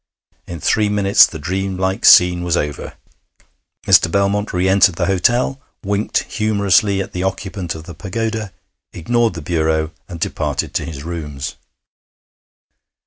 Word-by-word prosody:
In 85 Hz, -1 st, -7 dB
three 105 Hz, +8 st, +1 dB
minutes 100 Hz, -1 st, +5 dB
the 80 Hz, -, -8 dB
dream 95 Hz, +4 st, -3 dB
like 95 Hz, +1 st, -1 dB
scene 90 Hz, 0 st, +6 dB
was 90 Hz, -1 st, 0 dB
over. 75 Hz, -1 st, -4 dB, 0.9 s
Mr. -, -, +5 dB
Belmont 100 Hz, +2 st, 0 dB
re 90 Hz, +1 st, 0 dB
entered 95 Hz, -2 st, +4 dB
the 85 Hz, -, -1 dB
hotel, 120 Hz, +8 st, +1 dB, 0.2 s
winked 100 Hz, +2 st, -1 dB
humorously 100 Hz, -2 st, +1 dB
at 100 Hz, -, -13 dB
the 90 Hz, -, -3 dB
occupant 95 Hz, -2 st, -4 dB
of 80 Hz, -, -9 dB
the 85 Hz, -, -10 dB
pagoda, 110 Hz, +4 st, -4 dB, 0.4 s
ignored 115 Hz, +4 st, 0 dB
the 80 Hz, -, -7 dB
bureau, 80 Hz, -1 st, 0 dB, 0.2 s
and 85 Hz, -3 st, -8 dB
departed -, -, -3 dB
to -, -, -2 dB
his 75 Hz, -4 st, -8 dB
rooms. 75 Hz, -5 st, -6 dB
95 Hz, 140 wpm, -18 LUFS, 85-100 Hz, 0.9 s, scene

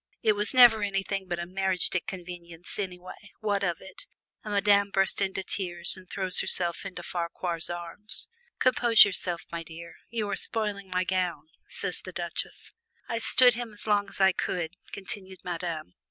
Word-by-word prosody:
"It 220 Hz, -, +5 dB
was 210 Hz, 0 st, +6 dB
never 240 Hz, -4 st, +7 dB
anything 195 Hz, -1 st, -2 dB
but 175 Hz, -1 st, -2 dB
a 170 Hz, -, -3 dB
'mariage 190 Hz, 0 st, +1 dB
de 185 Hz, -, +1 dB
convenance' 175 Hz, -1 st, -9 dB
anyway, 185 Hz, +1 st, -6 dB
what 205 Hz, -2 st, 0 dB
of 175 Hz, -4 st, 0 dB
it 190 Hz, -1 st, -12 dB, 0.2 s
?" -, -, -52 dB
and 215 Hz, -, -6 dB
Madame 200 Hz, 0 st, +4 dB
bursts 195 Hz, 0 st, +1 dB
into 190 Hz, -1 st, -1 dB
tears 175 Hz, -4 st, 0 dB
and 185 Hz, -1 st, -14 dB
throws 190 Hz, -2 st, -1 dB
herself 175 Hz, +2 st, 0 dB
into 185 Hz, -, -8 dB
Farquar's 170 Hz, -1 st, -3 dB
arms. 175 Hz, +4 st, -5 dB, 0.3 s
"Compose 240 Hz, -3 st, +6 dB
yourself, 180 Hz, -3 st, -2 dB
my 170 Hz, 0 st, -4 dB
dear 165 Hz, +1 st, -11 dB
you 220 Hz, -2 st, -2 dB
are -, -, 0 dB
spoiling 205 Hz, -4 st, -1 dB
my 185 Hz, 0 st, +1 dB
gown," 180 Hz, -5 st, -1 dB, 0.2 s
says -, -, -2 dB
the -, -, -8 dB
Duchesse. -, -, -5 dB, 0.3 s
"I 230 Hz, -, -2 dB
stood 245 Hz, +2 st, +6 dB
him 235 Hz, -2 st, -5 dB
as 205 Hz, -, -2 dB
long 205 Hz, -2 st, +2 dB
as -, -, -6 dB
I 190 Hz, 0 st, +6 dB
could," 175 Hz, -1 st, -3 dB, 0.2 s
continued 190 Hz, -1 st, -5 dB
Madame. 170 Hz, -, -4 dB
190 Hz, 175 wpm, -28 LUFS, 175-205 Hz, 0.3 s, never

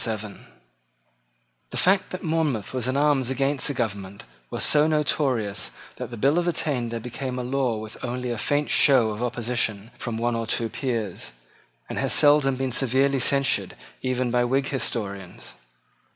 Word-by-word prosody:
The 110 Hz, -2 st, -4 dB, 1.4 s
fact 190 Hz, +1 st, +3 dB
that 185 Hz, -, -6 dB
Monmouth 155 Hz, -, 0 dB
was 125 Hz, -2 st, -1 dB
in 130 Hz, +2 st, 0 dB
arms 140 Hz, -3 st, +3 dB
against 135 Hz, +1 st, +1 dB
the 145 Hz, -, -1 dB
government 100 Hz, -4 st, -3 dB, 0.3 s
was -, -, -1 dB
so 150 Hz, 0 st, +5 dB
notorious 135 Hz, -9 st, 0 dB, 0.3 s
that -, -, -5 dB
the 120 Hz, -, -7 dB
bill 140 Hz, +9 st, +3 dB
of 175 Hz, -, -1 dB
attainder 125 Hz, -9 st, -1 dB
became 125 Hz, +2 st, -5 dB
a 125 Hz, -, -2 dB
law 125 Hz, -2 st, 0 dB
with 110 Hz, 0 st, -9 dB
only 125 Hz, 0 st, -3 dB
a 120 Hz, -, -2 dB
faint 145 Hz, +5 st, 0 dB
show 125 Hz, -6 st, +5 dB
of 105 Hz, +2 st, -6 dB
opposition 120 Hz, -3 st, -1 dB
from 115 Hz, -2 st, -3 dB
one 120 Hz, +1 st, 0 dB
or 115 Hz, -1 st, -2 dB
two 115 Hz, 0 st, 0 dB
peers, 110 Hz, -, -3 dB, 0.5 s
and -, -, -4 dB
has -, -, 0 dB
seldom 145 Hz, -2 st, +5 dB
been 130 Hz, 0 st, -2 dB
severely 135 Hz, +2 st, +2 dB
censured 140 Hz, +1 st, +2 dB, 0.3 s
even 130 Hz, -1 st, -1 dB
by 120 Hz, 0 st, +3 dB
Whig 135 Hz, +3 st, +1 dB
historians. 100 Hz, -8 st, -4 dB
125 Hz, 160 wpm, -25 LUFS, 115-140 Hz, 1.4 s, so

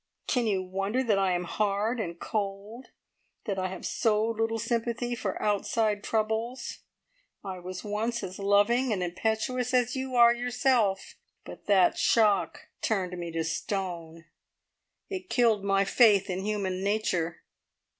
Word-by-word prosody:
Can 245 Hz, -3 st, +1 dB
you 195 Hz, -3 st, 0 dB
wonder 195 Hz, +7 st, -1 dB
that 215 Hz, -5 st, +2 dB
I 190 Hz, -2 st, +2 dB
am 175 Hz, 0 st, -1 dB
hard 210 Hz, +5 st, -1 dB
and 170 Hz, -5 st, -4 dB
cold 210 Hz, +3 st, -4 dB, 0.6 s
that 200 Hz, -3 st, -2 dB
I 185 Hz, -, 0 dB
have 185 Hz, -1 st, -7 dB
so 215 Hz, -2 st, +1 dB
little 225 Hz, 0 st, -1 dB
sympathy 235 Hz, +1 st, -2 dB
for 205 Hz, -5 st, -3 dB
outside 210 Hz, 0 st, 0 dB
troubles? 225 Hz, +3 st, -2 dB, 0.6 s
I 190 Hz, -2 st, -6 dB
was 180 Hz, +1 st, -7 dB
once 220 Hz, +3 st, -2 dB
as 185 Hz, +1 st, -6 dB
loving 205 Hz, +6 st, +3 dB
and 190 Hz, -4 st, 0 dB
impetuous 225 Hz, +7 st, -1 dB
as 250 Hz, 0 st, +2 dB
you 260 Hz, -1 st, -3 dB
are 235 Hz, -1 st, +7 dB
yourself, 240 Hz, -4 st, 0 dB, 0.3 s
but -, -, -11 dB
that 190 Hz, -3 st, +4 dB
shock 205 Hz, -6 st, +2 dB
turned 185 Hz, -4 st, -1 dB
me 170 Hz, -1 st, -5 dB
to 165 Hz, 0 st, -1 dB
stone. 165 Hz, -1 st, -4 dB, 0.8 s
It 370 Hz, -2 st, -6 dB
killed 230 Hz, -5 st, +3 dB
my 195 Hz, 0 st, +2 dB
faith 200 Hz, -3 st, +4 dB
in 180 Hz, -, -2 dB
human 195 Hz, -3 st, -2 dB
nature!" 185 Hz, -5 st, -1 dB
210 Hz, 145 wpm, -28 LUFS, 190-235 Hz, 0.8 s, are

